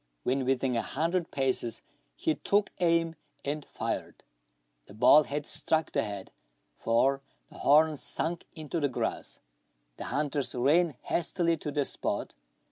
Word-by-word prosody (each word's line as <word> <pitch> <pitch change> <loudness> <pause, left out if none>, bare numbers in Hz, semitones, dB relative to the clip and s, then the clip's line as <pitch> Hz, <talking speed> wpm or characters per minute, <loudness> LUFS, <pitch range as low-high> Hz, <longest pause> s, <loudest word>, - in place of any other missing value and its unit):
When 130 +1 0
within 130 -1 +1
a 115 - +2
hundred 165 +4 -1
paces 130 -4 0 0.3
he 160 - 0
took 205 +5 +1
aim, 165 -2 +2 0.3
and 145 +1 -2
fired. - - -4 0.6
The 100 - -13
ball 150 +7 +7
had 145 +1 -3
struck 160 0 0
the - - +1
head, 100 -2 -6 0.4
for 135 +4 +2 0.3
the - - -12
horns 150 +1 +4
sunk 170 +1 -1
into 155 +1 -3
the 145 -2 +1
grass. 130 - -3 0.6
The - - -6
hunters 145 -2 -1
ran 150 +5 +3
hastily 170 0 0
to 150 - -5
the 145 -1 0
spot. - - -3
145 Hz, 140 wpm, -29 LUFS, 135-165 Hz, 0.6 s, ball